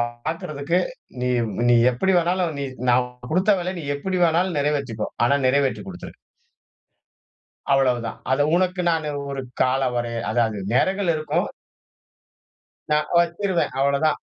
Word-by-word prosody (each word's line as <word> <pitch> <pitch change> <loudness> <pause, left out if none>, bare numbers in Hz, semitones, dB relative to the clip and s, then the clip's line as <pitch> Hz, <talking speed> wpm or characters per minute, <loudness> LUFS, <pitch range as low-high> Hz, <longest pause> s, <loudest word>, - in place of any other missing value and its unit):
பாக்கறதுக்கு, 145 +6 -2 0.4
நீ 125 - 0 0.4
நீ 120 - +6 0.2
எப்டி 190 +10 +1
வேணாலும் 175 -1 0
நீ - - -2 0.3
நான் 125 +1 +3 0.2
குடுத்த 185 +6 +3
வேலைய 180 +1 -3
நீ 155 - -8
எப்டி 185 +5 -2
வேணாலும் 170 +1 +1
நெறைவேத்திக்கோ. 140 -7 -1 0.2
ஆனா, 140 +4 +3
நிறைவேற்றிக் 140 +6 +1
குடுத்துரு. 180 -1 -9 1.6
அவ்வளவுதான். 125 -4 +1
அதை 145 +2 +3
உனக்கு 180 +1 +1
நான் 160 -2 -1 0.2
ஒரு 135 -1 -4 0.2
காலவரை 125 -2 0 0.2
அதாவது 110 -2 +1
நேரங்கள் 190 +6 +2
இருக்கும். 155 0 -1 1.5
நான் 150 0 +2
வச்சுருவேன், 170 -1 0
அவ்வளதான். 140 +3 +2
145 Hz, 115 wpm, -23 LUFS, 130-175 Hz, 1.6 s, நீ